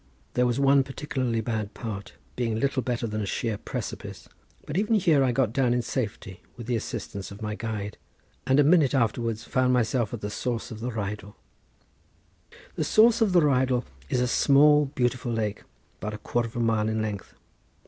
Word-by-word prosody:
There 125 Hz, 0 st, +2 dB
was 120 Hz, +2 st, 0 dB
one 140 Hz, 0 st, +5 dB
particularly 130 Hz, -4 st, -2 dB
bad 110 Hz, -2 st, -3 dB
part, 105 Hz, -5 st, -6 dB, 0.2 s
being 115 Hz, -3 st, -1 dB
little 140 Hz, +1 st, +1 dB
better 120 Hz, -1 st, -2 dB
than 110 Hz, -1 st, -3 dB
a 100 Hz, -, -3 dB
sheer 115 Hz, +2 st, -1 dB
precipice; -, -, -6 dB, 0.4 s
but 150 Hz, -, -6 dB
even 210 Hz, +4 st, +2 dB
here 165 Hz, -8 st, +4 dB
I 130 Hz, -, +2 dB
got 120 Hz, -3 st, +1 dB
down 125 Hz, -2 st, +2 dB
in 125 Hz, -, 0 dB
safety 105 Hz, -6 st, -4 dB, 0.2 s
with 120 Hz, -, -7 dB
the 120 Hz, 0 st, 0 dB
assistance 100 Hz, -3 st, -5 dB
of 100 Hz, +2 st, -10 dB
my 105 Hz, 0 st, -2 dB
guide, 105 Hz, -2 st, -5 dB, 0.5 s
and 130 Hz, +2 st, +4 dB
a -, -, +7 dB
minute 150 Hz, -3 st, +4 dB
afterwards 115 Hz, -2 st, 0 dB
found 130 Hz, -1 st, +1 dB
myself 120 Hz, -2 st, +1 dB
at 120 Hz, -, -6 dB
the 105 Hz, -, -4 dB
source 120 Hz, +2 st, -3 dB
of 110 Hz, -, -7 dB
the 120 Hz, +3 st, -3 dB
Rheidol. 105 Hz, -2 st, -5 dB, 1.4 s
The -, -, -2 dB
source 230 Hz, +2 st, +5 dB
of 215 Hz, -3 st, +4 dB
the 180 Hz, -1 st, +5 dB
Rheidol 130 Hz, -4 st, +2 dB, 0.2 s
is 125 Hz, -, +1 dB
a 125 Hz, -, +2 dB
small, 150 Hz, +3 st, +5 dB
beautiful 125 Hz, -3 st, -1 dB
lake, 110 Hz, -2 st, -2 dB, 0.4 s
about 105 Hz, 0 st, -4 dB
a -, -, -6 dB
quarter 120 Hz, +3 st, -1 dB
of 115 Hz, -, -14 dB
a -, -, -2 dB
mile 110 Hz, -2 st, +1 dB
in 110 Hz, 0 st, -1 dB
length. 105 Hz, -3 st, -4 dB
120 Hz, 190 wpm, -26 LUFS, 110-135 Hz, 1.4 s, a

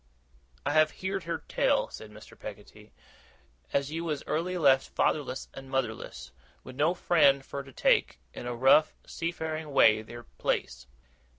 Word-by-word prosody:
'I 145 Hz, -, +1 dB
have 155 Hz, 0 st, +5 dB, 0.2 s
heerd 190 Hz, -2 st, -2 dB
her 165 Hz, -1 st, -4 dB
tell,' -, -, +1 dB
said 110 Hz, -, -9 dB
Mr. 110 Hz, 0 st, -14 dB
Peggotty, -, -, -11 dB, 0.8 s
'as 140 Hz, +1 st, 0 dB
you 165 Hz, +1 st, -3 dB
was 150 Hz, -4 st, -3 dB
early 180 Hz, +3 st, -1 dB
left 135 Hz, -5 st, +4 dB
fatherless 140 Hz, -3 st, -1 dB
and 135 Hz, 0 st, -10 dB
motherless, 110 Hz, -, -3 dB, 0.3 s
with 130 Hz, -, -10 dB
no 155 Hz, +6 st, +2 dB
friend 140 Hz, -6 st, +3 dB
fur 140 Hz, -, -5 dB
to 135 Hz, -1 st, -13 dB
take, 120 Hz, -, +2 dB, 0.2 s
in 120 Hz, -, -7 dB
a 120 Hz, -, -3 dB
rough 135 Hz, +5 st, +5 dB
seafaring 160 Hz, -2 st, -4 dB
way, 110 Hz, -5 st, +5 dB
their 120 Hz, +2 st, -10 dB
place. -, -, -3 dB
140 Hz, 155 wpm, -29 LUFS, 120-160 Hz, 0.8 s, have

